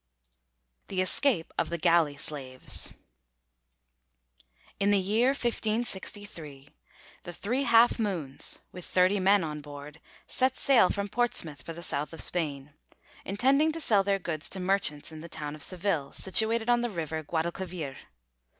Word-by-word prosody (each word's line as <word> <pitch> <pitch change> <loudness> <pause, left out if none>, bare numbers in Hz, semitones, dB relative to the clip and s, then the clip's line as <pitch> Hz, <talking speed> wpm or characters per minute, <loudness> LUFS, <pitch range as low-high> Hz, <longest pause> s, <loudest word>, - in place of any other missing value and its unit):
THE 190 - -3
ESCAPE 185 -1 +2
OF - - 0
THE 170 - -2
GALLEY 165 -3 +3
SLAVES 135 -4 -5 1.9
In 200 - +2
the 205 - +5
year 210 +6 +2
1563 205 - -3 0.5
the 175 - -7
'Three 240 +10 -1
Half 230 +1 +5
Moons,' 175 -11 -3
with 180 - -9
thirty 185 +3 +3
men 195 0 +4
on 150 -1 -4
board, 145 +1 -10 0.3
set 260 0 +1
sail 250 -9 +5
from 200 0 -2
Portsmouth 205 - -2
for 165 - -7
the 170 +1 -9
south 150 -2 -2
of 165 - -5
Spain, 145 -4 -2 0.5
intending 270 +10 +3
to 330 - -4
sell 215 -10 +4
their 195 0 +1
goods 165 -5 -4
to 190 - -4
merchants 180 -6 +1
in 155 -1 -9
the 170 - -9
town 150 -2 -5
of 155 - -9
Seville, 175 -6 0
situated 220 +4 +3
on 240 0 +3
the 240 - -1
river 160 -5 -3
Guadalquivir. 165 -1 -3
185 Hz, 145 wpm, -29 LUFS, 155-215 Hz, 1.9 s, the